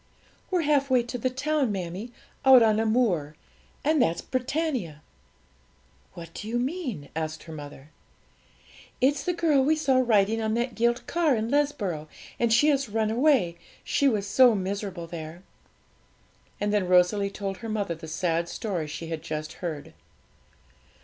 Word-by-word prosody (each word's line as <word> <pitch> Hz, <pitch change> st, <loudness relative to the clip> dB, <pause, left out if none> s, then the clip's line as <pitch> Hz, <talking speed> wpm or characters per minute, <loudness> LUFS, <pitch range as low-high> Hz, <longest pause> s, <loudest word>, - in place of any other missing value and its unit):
'We're 365 Hz, -2 st, +1 dB
half 285 Hz, -2 st, +2 dB
way 255 Hz, -2 st, +3 dB
to 245 Hz, +1 st, -6 dB
the 255 Hz, -, 0 dB
town, 270 Hz, -1 st, 0 dB
mammie 190 Hz, +4 st, -5 dB, 0.3 s
out 260 Hz, -3 st, +8 dB
on 215 Hz, -1 st, +3 dB
a 225 Hz, -, +1 dB
moor; 185 Hz, -11 st, +1 dB, 0.5 s
and 305 Hz, -1 st, +3 dB
that's 170 Hz, -7 st, +1 dB
Britannia!' 255 Hz, -, -2 dB, 1.1 s
'What 165 Hz, -1 st, -10 dB
do 210 Hz, -, -7 dB
you 235 Hz, +2 st, -1 dB
mean?' 250 Hz, -, -3 dB
asked 160 Hz, 0 st, -4 dB
her 160 Hz, -, -10 dB
mother. 145 Hz, -1 st, -10 dB, 1.1 s
'It's 275 Hz, +2 st, +2 dB
the 360 Hz, -, 0 dB
girl 320 Hz, -5 st, +3 dB
we 305 Hz, +4 st, +3 dB
saw 275 Hz, -4 st, +2 dB
riding 220 Hz, -1 st, +2 dB
on 220 Hz, 0 st, 0 dB
that 240 Hz, +1 st, -1 dB
gilt 235 Hz, +1 st, 0 dB
car 330 Hz, -6 st, +2 dB
in 225 Hz, +1 st, -2 dB
Lesborough, 210 Hz, -, 0 dB, 0.3 s
and 235 Hz, -1 st, +2 dB
she 240 Hz, +7 st, +5 dB
has 275 Hz, -4 st, +1 dB
run 220 Hz, 0 st, 0 dB
away, 235 Hz, -, +2 dB, 0.2 s
she 280 Hz, -, +1 dB
was 210 Hz, -6 st, +1 dB
so 240 Hz, +3 st, +5 dB
miserable 195 Hz, -2 st, -4 dB
there.' 165 Hz, +1 st, -8 dB, 1.2 s
And 205 Hz, 0 st, 0 dB
then 200 Hz, -3 st, +1 dB
Rosalie 180 Hz, +3 st, +3 dB
told 195 Hz, -1 st, -5 dB
her 230 Hz, -, -7 dB
mother 205 Hz, -5 st, -1 dB
the 165 Hz, 0 st, -10 dB
sad 170 Hz, +1 st, -1 dB
story 185 Hz, -9 st, -3 dB
she 160 Hz, +2 st, -7 dB
had 160 Hz, -2 st, -4 dB
just 155 Hz, -1 st, -5 dB
heard. 160 Hz, -5 st, -5 dB
220 Hz, 160 wpm, -26 LUFS, 170-260 Hz, 1.2 s, out